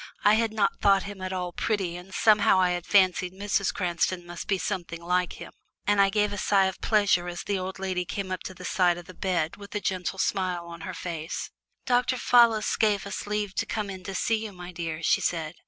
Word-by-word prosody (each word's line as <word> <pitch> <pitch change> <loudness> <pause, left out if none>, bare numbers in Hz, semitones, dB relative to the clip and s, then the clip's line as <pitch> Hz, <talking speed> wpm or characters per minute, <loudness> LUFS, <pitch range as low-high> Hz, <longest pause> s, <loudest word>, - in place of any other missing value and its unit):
I 210 - +6
had 225 0 +2
not 210 -2 0
thought 195 -1 +4
him 200 -1 -8
at 185 0 -3
all 180 -1 -3
"pretty," 190 -5 -1
and 180 +2 -10
somehow 205 -2 +4
I 180 -1 +3
had 175 -1 -3
fancied 185 -2 +3
Mrs. 200 0 0
Cranston 175 -1 -1
must 175 0 -7
be 195 - +2
something 175 -4 -4
like 180 +1 0
him, - - -10 0.3
and 205 -1 +4
I 195 - +5
gave 210 0 +1
a 205 - -4
sigh 195 -1 +3
of 190 -1 -3
pleasure 200 -5 +3
as 175 0 -5
the 200 -2 -1
old 185 +1 -5
lady 190 -1 -2
came 190 +1 -5
up 185 - -3
to 185 - -6
the 180 +1 -9
side 175 0 +2
of 175 - -9
the 185 - -11
bed 170 -3 -1
with 200 +1 -11
a - - +1
gentle 185 -1 -2
smile 185 -3 -1
on 170 0 -9
her 185 - -6
face. 165 -1 -5 0.3
"Dr. 250 +1 +2
Fallis 235 -3 +4
gave 210 -3 +2
us 200 - -5
leave 210 -1 -2
to - - -1
come 210 -2 -3
in 185 -1 -8
to 195 - -5
see 225 +3 0
you, 215 - -5
my 180 -1 -9
dear," 165 -2 -5
she - - +3
said. 160 -2 -1
190 Hz, 235 wpm, -27 LUFS, 175-205 Hz, 0.3 s, I